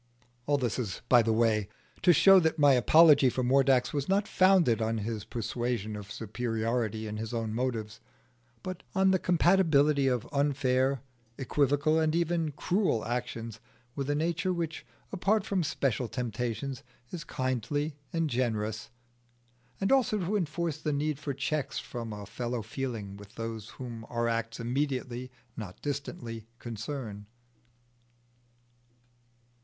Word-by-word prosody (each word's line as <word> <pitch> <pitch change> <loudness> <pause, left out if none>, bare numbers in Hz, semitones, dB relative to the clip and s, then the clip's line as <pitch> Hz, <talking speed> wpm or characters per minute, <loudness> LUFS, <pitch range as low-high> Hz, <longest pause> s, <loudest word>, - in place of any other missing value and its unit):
All 145 0 +3
this 125 -3 -1
is 110 -5 -4
by 120 -2 +7
the 115 0 +1
way, 110 -2 +2 0.3
to 180 - +6
show 195 +4 +7
that 160 -2 +1
my 145 -2 +6
apology 145 +2 +6
for 130 +1 -2
Mordax 130 -1 +3
was 145 +1 -2
not 200 +1 +2
founded 185 - +4
on 110 +1 0
his 110 0 -4
persuasion 115 -2 -3
of 105 0 -8
superiority 115 0 -2
in 105 0 -5
his 110 +2 -4
own 115 -2 -2
motives, 115 -3 -2 0.6
but 185 -1 -5
on 190 0 +4
the 185 - +3
compatibility 160 -6 +3
of 125 -3 0
unfair, 135 -2 +1 0.4
equivocal, 145 +3 +2
and 160 0 +1
even 170 -2 0
cruel 180 - 0
actions 115 -2 -4 0.4
with 140 0 -3
a 145 - +2
nature 170 +4 0
which, 165 -3 -3 0.2
apart 200 +2 +1
from 195 -2 0
special 135 -5 -1
temptations, 125 +2 -3 0.3
is 170 -3 -5
kindly 145 +3 -2 0.2
and 165 -1 0
generous; 110 -4 -2 0.9
and 195 - 0
also 260 -5 +3
to 195 +2 -1
enforce 170 -4 -1
the 150 - -1
need 145 0 -1
of 140 -1 -2
checks 145 +1 -2
from 115 -2 -5
a 105 -1 -7
fellow 120 +3 -4
feeling 110 -4 -5
with 100 +1 -14
those 115 -1 -5
whom 120 -3 -7
our 120 -1 0
acts 115 0 -2
immediately 125 0 -2 0.3
(not 100 -5 -7
distantly) 140 -6 -5
concern. 115 -3 -6
130 Hz, 140 wpm, -29 LUFS, 115-155 Hz, 0.9 s, by